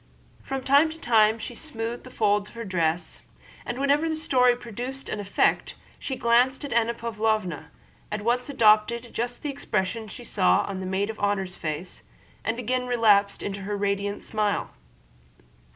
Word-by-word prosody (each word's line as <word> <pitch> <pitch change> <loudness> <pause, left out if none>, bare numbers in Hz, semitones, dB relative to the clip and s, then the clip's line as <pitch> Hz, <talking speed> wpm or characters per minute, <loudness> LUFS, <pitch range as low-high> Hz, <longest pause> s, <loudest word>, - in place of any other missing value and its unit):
From 270 -1 -4
time 285 +4 +5
to 320 +1 -8
time 220 -3 +4
she 235 - -6
smoothed 235 -4 -5
the - - -9
folds 210 -3 +1
of - - -18
her 230 0 -5
dress, 175 -3 -1 0.5
and 240 - -3
whenever 285 +4 +2
the 315 - 0
story 250 -5 +3
produced 245 +3 -6
an 210 - -3
effect 200 -1 +1 0.2
she 265 - -3
glanced 250 +4 +2
at 275 - -4
Anna 235 0 +2
Pávlovna, 215 -7 -1 0.4
at 210 0 -3
once 245 +3 0
adopted 235 -1 +3
just 245 +4 -3
the 295 - -1
expression 220 -5 -2
she 245 - -9
saw 90 - +2
on 195 -1 -4
the 185 - -4
maid 195 +3 0
of 220 - -13
honor's 195 -3 -1
face, 160 +3 -5 0.4
and 225 +1 -1
again 250 +1 -1
relapsed 210 -5 +3
into 200 0 -4
her 205 +1 -3
radiant 200 0 -1
smile. 210 -2 -1
225 Hz, 170 wpm, -26 LUFS, 200-250 Hz, 0.5 s, time